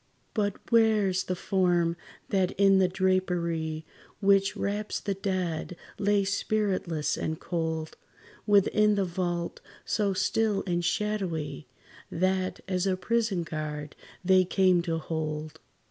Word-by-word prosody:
But, 205 Hz, -3 st, 0 dB, 0.2 s
where 220 Hz, -4 st, +4 dB
's 185 Hz, -, +1 dB
the 185 Hz, -, -3 dB
form 175 Hz, -2 st, +1 dB, 0.3 s
that 190 Hz, -2 st, +1 dB
in 195 Hz, 0 st, +5 dB
the 185 Hz, -, +4 dB
drapery, 175 Hz, -4 st, 0 dB, 0.3 s
Which 200 Hz, 0 st, +3 dB
wraps 205 Hz, +1 st, -2 dB
the 200 Hz, -, -2 dB
dead, 185 Hz, -4 st, -2 dB, 0.2 s
lay, 205 Hz, -1 st, +3 dB
spiritless 195 Hz, -6 st, 0 dB
and 160 Hz, 0 st, -3 dB
cold, 160 Hz, -2 st, -3 dB, 0.5 s
Within 210 Hz, +1 st, +4 dB
the 200 Hz, -1 st, +1 dB
vault 175 Hz, -1 st, -3 dB, 0.2 s
so 205 Hz, -2 st, +1 dB
still 210 Hz, +1 st, +1 dB
and 175 Hz, -2 st, 0 dB
shadowy, 175 Hz, -, -2 dB, 0.4 s
That, 185 Hz, +1 st, 0 dB
as 185 Hz, 0 st, 0 dB
a 185 Hz, -1 st, +1 dB
prison 220 Hz, -1 st, 0 dB
guard, 150 Hz, -2 st, -5 dB, 0.3 s
they 185 Hz, 0 st, +6 dB
came 185 Hz, -1 st, +3 dB
to 165 Hz, -, +1 dB
hold? 155 Hz, -1 st, -4 dB
185 Hz, 125 wpm, -28 LUFS, 170-200 Hz, 0.5 s, they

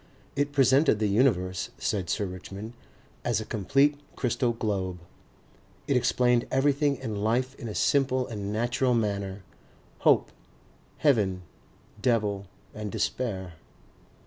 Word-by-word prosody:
It 145 Hz, +1 st, 0 dB
presented 135 Hz, -2 st, +4 dB
the 105 Hz, -, 0 dB
universe, 100 Hz, -4 st, +1 dB
said 95 Hz, -4 st, -2 dB
Sir 105 Hz, -, 0 dB
Richmond, 95 Hz, +4 st, -7 dB, 0.5 s
as 120 Hz, -3 st, +1 dB
a 110 Hz, -, -5 dB
complete 140 Hz, +8 st, +2 dB, 0.2 s
crystal 125 Hz, -1 st, 0 dB
globe. 100 Hz, -5 st, -2 dB, 0.9 s
It 140 Hz, -, +2 dB
explained 125 Hz, -1 st, +2 dB
everything 140 Hz, +1 st, +2 dB
in 115 Hz, -5 st, -5 dB
life 125 Hz, +4 st, +1 dB
in 120 Hz, -, -6 dB
a 105 Hz, -, -5 dB
simple 130 Hz, -2 st, +2 dB
and 105 Hz, -4 st, -5 dB
natural 120 Hz, +3 st, +1 dB
manner, 100 Hz, -3 st, -2 dB, 0.6 s
hope, -, -, +4 dB, 0.7 s
heaven, 100 Hz, -11 st, +2 dB, 0.6 s
devil 105 Hz, -5 st, +1 dB, 0.3 s
and 105 Hz, -1 st, -5 dB
despair. 95 Hz, -9 st, -2 dB
115 Hz, 120 wpm, -27 LUFS, 100-130 Hz, 0.9 s, presented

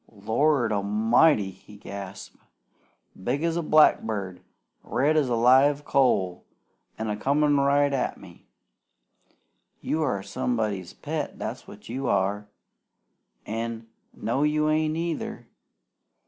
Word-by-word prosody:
"Lord 115 Hz, +4 st, +1 dB
A'mighty!" 105 Hz, +3 st, +3 dB
he 105 Hz, +2 st, -16 dB
gasped. 100 Hz, -2 st, -9 dB, 0.9 s
"Big 135 Hz, -, -1 dB
as 165 Hz, -1 st, 0 dB
a 170 Hz, -, 0 dB
blackbird, 110 Hz, -, +2 dB, 0.4 s
red 150 Hz, +4 st, +1 dB
as 145 Hz, -5 st, +2 dB
a 120 Hz, -, +1 dB
live 135 Hz, +5 st, +4 dB
coal, 100 Hz, -10 st, +1 dB, 0.5 s
an' 110 Hz, -, -3 dB
a 105 Hz, -, -1 dB
comin' 145 Hz, +5 st, +2 dB
right 140 Hz, +1 st, +3 dB
at 135 Hz, -, -1 dB
me. -, -, -16 dB, 1.3 s
You 160 Hz, -, -2 dB
are 125 Hz, -10 st, -1 dB
somebody's 100 Hz, -3 st, -2 dB
pet, -, -, -5 dB
that's -, -, -6 dB
what 105 Hz, -, -13 dB
you 130 Hz, +3 st, -4 dB
are! 100 Hz, +1 st, 0 dB, 1.0 s
An' 115 Hz, +1 st, -5 dB, 0.2 s
no, 120 Hz, +5 st, -2 dB
you 150 Hz, +1 st, +2 dB
ain't 155 Hz, 0 st, 0 dB
either. 165 Hz, -1 st, -4 dB
120 Hz, 120 wpm, -26 LUFS, 105-145 Hz, 1.3 s, live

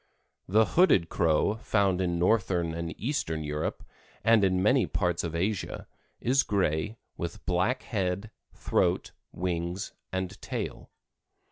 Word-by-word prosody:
The 110 Hz, +4 st, +4 dB
Hooded 105 Hz, -, +4 dB
Crow, 85 Hz, +4 st, +2 dB
found 100 Hz, -4 st, +1 dB
in 85 Hz, -2 st, 0 dB
northern 90 Hz, -3 st, +2 dB
and 85 Hz, 0 st, -5 dB
eastern 100 Hz, -, -1 dB
Europe 75 Hz, +1 st, -3 dB, 0.4 s
and 115 Hz, -2 st, +5 dB
in 95 Hz, -1 st, +2 dB
many 125 Hz, +4 st, +4 dB
parts 90 Hz, -3 st, 0 dB
of 85 Hz, -1 st, -3 dB
Asia, 95 Hz, +3 st, -2 dB, 0.3 s
is 135 Hz, +3 st, +3 dB
gray, 100 Hz, +1 st, 0 dB, 0.2 s
with 85 Hz, +4 st, -5 dB
black 95 Hz, +9 st, +1 dB
head, 100 Hz, 0 st, -2 dB, 0.2 s
throat, -, -, 0 dB, 0.2 s
wings 85 Hz, +1 st, -3 dB, 0.2 s
and 95 Hz, +1 st, -4 dB
tail. -, -, -5 dB
95 Hz, 125 wpm, -28 LUFS, 85-105 Hz, 0.4 s, and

